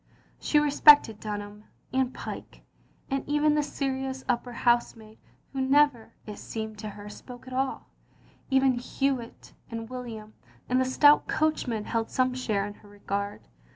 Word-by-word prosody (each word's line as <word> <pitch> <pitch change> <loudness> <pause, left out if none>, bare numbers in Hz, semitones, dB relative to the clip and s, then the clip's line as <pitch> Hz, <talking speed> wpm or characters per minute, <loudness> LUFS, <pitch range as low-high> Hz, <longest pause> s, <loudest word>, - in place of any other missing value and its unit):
She 300 - +1
respected 290 -6 +6
Dunham, 210 0 -6 0.3
and 260 -1 +1
Pyke, - - -8 0.5
and 275 0 0
even 295 +1 +3
the 300 - +2
serious 265 -2 -3
upper 245 +1 -1
housemaid, 235 -2 0 0.3
who 270 - -2
never, 270 -3 +3
it 210 -1 -8
seemed 220 -1 -6
to 215 0 -5
her, 205 0 -10
spoke 245 +4 -11
at 255 - -9
aU; 265 +1 -1 0.7
even 265 -2 +3
Hewitt 255 -1 -3 0.2
and 230 +1 -6
William 225 -4 -7 0.3
and 255 +1 +2
the - - +2
stout 290 +3 +5
coachman 255 -9 0
held 225 -1 -2
some 255 0 +1
share 215 -6 -1
in 205 - -6
her 205 - -17
regard. 200 - -5
245 Hz, 150 wpm, -27 LUFS, 215-270 Hz, 0.7 s, respected